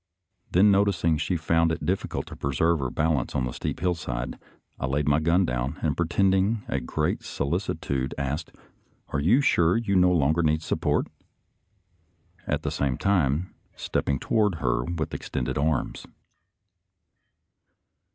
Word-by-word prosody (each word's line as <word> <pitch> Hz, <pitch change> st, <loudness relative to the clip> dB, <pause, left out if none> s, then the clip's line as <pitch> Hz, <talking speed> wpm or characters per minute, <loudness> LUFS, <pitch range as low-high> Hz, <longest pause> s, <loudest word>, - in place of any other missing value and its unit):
Then 100 Hz, +4 st, +5 dB
noticing 95 Hz, -5 st, +2 dB
she 85 Hz, +3 st, 0 dB
found 80 Hz, +1 st, +2 dB
it 80 Hz, -, -3 dB
difficult 95 Hz, +4 st, -2 dB
to -, -, -10 dB
preserve 80 Hz, +4 st, +1 dB
her 65 Hz, -2 st, -1 dB
bal 80 Hz, +2 st, +1 dB
ance -, -, -6 dB
on 65 Hz, -, +1 dB
the 60 Hz, -, -3 dB
steep -, -, -4 dB
hillside, 85 Hz, -9 st, -2 dB, 0.4 s
I 65 Hz, -, -1 dB
laid 70 Hz, +2 st, 0 dB
my 75 Hz, +1 st, +4 dB
gun 85 Hz, +4 st, +3 dB
down, 60 Hz, -1 st, -2 dB
and 75 Hz, -2 st, +1 dB
pretending 95 Hz, +5 st, +1 dB
a -, -, -1 dB
great 75 Hz, +4 st, -1 dB
solicitude, 70 Hz, -4 st, -2 dB
asked, 70 Hz, +3 st, -3 dB, 0.6 s
"Are 75 Hz, -, -1 dB
you 105 Hz, -, +4 dB
sure 85 Hz, -8 st, +3 dB
you 110 Hz, -4 st, 0 dB
no 90 Hz, -1 st, +5 dB
longer 80 Hz, 0 st, +2 dB
need 80 Hz, 0 st, +1 dB
support.?" -, -, 0 dB, 0.8 s
— 90 Hz, -3 st, -36 dB
at -, -, -1 dB
the -, -, -2 dB
same 65 Hz, -3 st, -1 dB
time 90 Hz, -4 st, +1 dB, 0.2 s
stepping 70 Hz, -, -1 dB
toward 105 Hz, -, +1 dB
her 60 Hz, -5 st, 0 dB
with 85 Hz, -3 st, -3 dB
extended -, -, -3 dB
arms. 80 Hz, +2 st, -1 dB
80 Hz, 150 wpm, -26 LUFS, 70-90 Hz, 0.8 s, Then